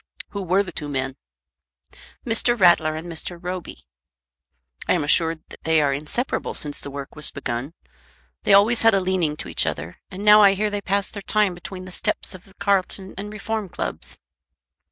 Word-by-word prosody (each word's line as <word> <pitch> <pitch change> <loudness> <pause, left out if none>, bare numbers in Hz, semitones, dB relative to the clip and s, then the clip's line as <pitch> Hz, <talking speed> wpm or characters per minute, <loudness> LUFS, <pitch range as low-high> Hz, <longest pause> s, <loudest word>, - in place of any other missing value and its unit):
"Who 200 - -5
were 190 +2 +2
the 185 - -8
two 150 -3 -6
men?" 135 -1 -2 1.1
"Mr. 240 0 +1
Rattler 170 -4 +5
and 160 +2 -6
Mr. 170 +1 -4
Roby." 180 0 -6 1.0
"I - - +4
am 175 -4 +1
assured 160 +1 +3
that - - -13
they 160 -1 +3
are 145 -2 +2
inseparable 155 - -3
since 145 -1 -1
the - - -7
work 140 0 -8
was 150 -1 0
begun. 135 +2 -4 0.7
They - - +3
always 220 +4 +5
had 225 -2 +5
a - - +3
leaning 180 -5 0
to - - -5
each - - +2
other, 80 +4 -4
and 195 +3 -7
now 210 0 +9
I 200 -1 +6
hear 210 +1 0
they 205 0 -2
pass 200 +1 0
their 205 - -7
time 210 -1 +2
between 185 +1 -8
the 185 - -9
steps - - -1
of 185 -1 -12
the 195 - -19
Carlton 195 -1 0
and 205 +2 -6
Reform 215 -1 -4
Clubs." - - -4
185 Hz, 190 wpm, -23 LUFS, 155-200 Hz, 1.1 s, now